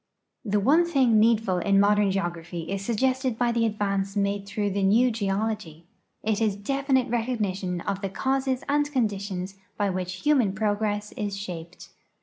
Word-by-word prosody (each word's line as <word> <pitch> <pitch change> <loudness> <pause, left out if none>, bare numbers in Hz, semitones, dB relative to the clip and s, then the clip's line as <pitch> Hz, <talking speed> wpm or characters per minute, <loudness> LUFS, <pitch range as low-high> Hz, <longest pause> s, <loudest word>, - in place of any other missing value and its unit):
The 210 -3 +1
one 290 - +4
thing 265 -10 +3
needful 215 -4 +3
in 195 +2 +3
modern 205 0 +4
geograph}'' 175 -3 -4
is 195 0 -3
suggested 255 +2 0
by 240 0 +2
the 230 -1 +2
advance 200 -2 -2
made 200 0 -1
through 205 0 -1
the 200 +1 -1
new 225 +6 +4
geology; 200 -6 -3 0.4
it 220 0 0
is 215 -3 +2
definite 265 +4 0
recognition 210 -7 -2
of 195 +2 -3
the 195 - -2
causes 265 +4 -1
and 290 +1 +1
conditions 200 -6 -2 0.2
by 205 -2 +1
which 185 0 -4
human 265 -10 +3
progress 210 0 -1
is 205 -4 -4
shaped. 180 -3 -8
205 Hz, 155 wpm, -26 LUFS, 195-240 Hz, 0.4 s, one